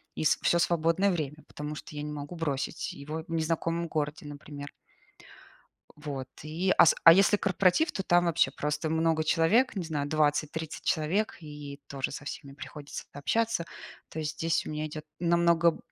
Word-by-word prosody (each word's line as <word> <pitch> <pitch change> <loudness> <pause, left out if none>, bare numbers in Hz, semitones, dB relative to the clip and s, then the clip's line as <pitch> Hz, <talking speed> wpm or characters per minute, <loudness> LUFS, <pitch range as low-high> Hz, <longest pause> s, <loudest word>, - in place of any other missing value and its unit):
и - - -2
с - - +4
всё 170 - +3
свободное 170 +4 +2
время, 155 -3 -3
потому 150 +1 -6
что 150 - -10
я 145 - -4
не 150 0 -4
могу 145 +3 -6
бросить 145 -5 -2
его 155 +3 -6
в - - -11
незнакомом 165 +1 0
городе, 150 -1 -3
например. 145 0 -8 1.3
Вот 145 -3 -5 0.2
и 165 +5 0
ас 165 - +7
а 165 - +12
если 195 +3 +5
корпоратив, 195 - +2
то 195 - -2
там 175 -1 +4
вообще 170 -1 +3
просто 150 +2 -2
много 160 0 +2
человек, 175 +11 +3
не 185 - -2
знаю, 145 -3 -2
20-30 155 +1 0
человек, 175 +8 0
и 145 -2 -9
тоже 135 -1 -2
со 145 - -7
всеми 140 -1 -7
приходится 145 +1 -8
общаться. 220 +6 0 0.4
То 160 - -8
есть 155 -1 -2
здесь 165 0 0
у - - -4
меня 155 0 -3
идет 155 0 -7 0.2
намного 170 -1 +3
155 Hz, 170 wpm, -29 LUFS, 150-170 Hz, 1.3 s, а